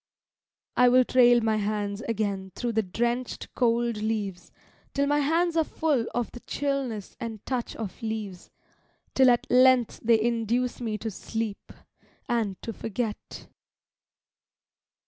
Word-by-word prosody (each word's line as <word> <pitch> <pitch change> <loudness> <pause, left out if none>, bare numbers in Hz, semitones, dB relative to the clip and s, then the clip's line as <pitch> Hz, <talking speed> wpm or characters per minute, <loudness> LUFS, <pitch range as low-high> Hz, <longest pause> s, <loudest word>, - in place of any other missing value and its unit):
I 250 0 +6
will 255 +1 +5
trail 245 -1 +5
my 220 -1 +1
hands 205 0 -2
again 200 -4 -2
through 240 -1 -2
the 220 0 +2
drenched, 235 +5 -2
cold 235 -2 +1
leaves 210 -4 -3 0.4
Till 280 0 +2
my 290 +1 +2
hands 330 +4 +1
are 325 - +4
full 295 -7 0
of 240 -1 -1
the 245 - -9
chillness 270 -7 -3
and 225 -4 -6
touch 250 -3 -3
of 220 +1 -6
leaves, 215 -5 -5 0.6
Till 260 -1 +6
at 240 -1 +3
length 255 -2 +5
they 230 0 +4
induce 235 +2 0
me 220 -3 -2
to 220 +1 -4
sleep, 220 +1 -5 0.6
and 225 -6 -1
to 225 - -4
forget. 220 0 -5
230 Hz, 135 wpm, -27 LUFS, 215-250 Hz, 0.6 s, I